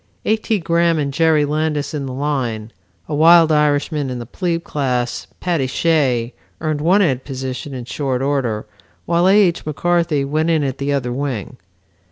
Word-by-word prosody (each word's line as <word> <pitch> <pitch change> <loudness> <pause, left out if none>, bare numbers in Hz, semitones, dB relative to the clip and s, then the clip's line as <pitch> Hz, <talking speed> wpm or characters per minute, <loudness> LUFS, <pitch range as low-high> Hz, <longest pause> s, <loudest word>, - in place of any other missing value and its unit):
A. 215 - +3
T. 220 0 -1
Graham 170 -1 +1
and 140 -2 -2
Jerry 160 -1 +3
Landis 150 -1 -1
in 140 -3 -3
the - - -5
line. 125 -6 -2 0.4
A - - -5
wild 165 +2 +6
Irishman 150 -1 +1
in 125 - -4
the 120 - -6
plebe 170 - -2
class, 125 -6 -2
Paddy 170 -7 0
Shea, 130 -5 +1 0.3
earned 155 -2 -2
one 185 +6 +4
end 130 -7 0
position 130 0 -5
in 125 -2 -6
short 130 -1 -2
order, 130 -6 -1 0.4
while 170 +2 +2
A. 195 +2 +5
H. 175 -5 +2
McCarthy 160 -1 0
went 155 +4 0
in 160 -3 +2
at 135 -1 -3
the 140 +1 -1
other 125 -4 -1
wing. 130 -7 -4
145 Hz, 175 wpm, -19 LUFS, 130-165 Hz, 0.4 s, wild